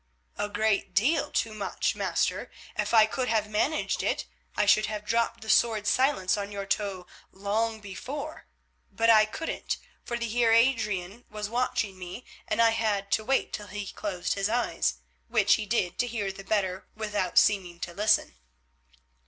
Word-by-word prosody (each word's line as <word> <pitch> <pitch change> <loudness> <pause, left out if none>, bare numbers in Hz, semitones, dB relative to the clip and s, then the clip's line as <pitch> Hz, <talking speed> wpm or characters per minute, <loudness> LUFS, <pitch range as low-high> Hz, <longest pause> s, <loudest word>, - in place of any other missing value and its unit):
"A 205 - -1
great 210 0 0
deal 280 +10 +2
too 225 - -1
much, 210 -2 -1
master. - - -1 0.3
If - - -1
I 220 -2 +7
could 250 +3 -2
have 220 -2 +1
managed 215 +9 0
it - - -1 0.3
I - - +3
should 210 +1 +4
have 210 -1 -5
dropped 230 +1 0
the 220 - -10
sword 220 -3 +3
Silence 255 -5 +2
on 200 0 -4
your 200 -1 -4
toe 195 -2 -2 0.3
long 220 +3 -1
before. 275 +10 -7 0.4
But 230 0 +4
I 215 -1 +7
couldn't, 315 +9 -4 0.3
for 235 - -3
the 235 0 -2
Heer 230 0 +2
Adrian 225 -3 +1
was 210 -1 -5
watching 220 -5 -1
me, 180 +7 -8 0.2
and - - -1
I 230 -1 +6
had 210 -3 -1
to 220 - +2
wait 265 +4 0
till 210 - -5
he 205 +1 -5
closed 185 -4 -3
his 200 +1 -1
eyes, 230 - 0 0.3
which - - +4
he 210 - 0
did 190 -5 0
to 245 - +2
hear 210 -4 -2
the 195 0 -10
better 195 -2 -1
without 210 -4 -2
seeming 185 -4 +3
to 175 - -4
listen." 205 - +2
210 Hz, 170 wpm, -28 LUFS, 200-230 Hz, 0.4 s, I